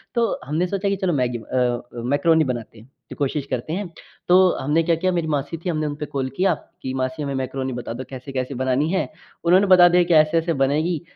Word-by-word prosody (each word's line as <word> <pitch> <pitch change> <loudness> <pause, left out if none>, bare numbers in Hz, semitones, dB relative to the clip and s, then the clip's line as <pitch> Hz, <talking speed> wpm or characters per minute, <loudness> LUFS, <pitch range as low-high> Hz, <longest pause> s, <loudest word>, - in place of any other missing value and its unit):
तो 235 -1 +1
हमने 155 +6 0
सोचा 200 +2 -1
कि 200 - +1
चलो 185 -2 -1
मैगी 125 -4 0
अ, 120 +1 -1
मैकरोनी 145 +7 +2
बनाते 120 -4 -5
हैं 115 +5 -17 0.2
कि - - -8
कोशिश 140 0 -2
करते 125 +6 -3
हैं। 195 0 -3 0.4
तो 185 +1 +6
हमने 150 +4 +1
क्या 165 0 +2
किया 185 +3 0
मेरी 170 -2 -1
मासी 145 +1 -2
थी 180 - 0
हमने 155 -2 -1
उनपे 150 +1 -4
कॉल 135 -2 -3
किया 190 -1 +3 0.3
कि 130 0 -4
मासी 130 +3 -2
हमें 140 -1 -3
मैकरोनी 130 0 -3
बता 120 -1 -5
दो 130 - -6
कैसे-कैसे 130 0 -5
बनानी 130 +4 0
है। 190 - 0 0.4
उन्होंने 185 +4 +4
बता 180 -2 +8
दिया 175 0 +4
कि 175 0 +1
ऐसे-ऐसे 160 +2 +3
बनेगी 155 +4 0
150 Hz, 215 wpm, -22 LUFS, 130-175 Hz, 0.4 s, बता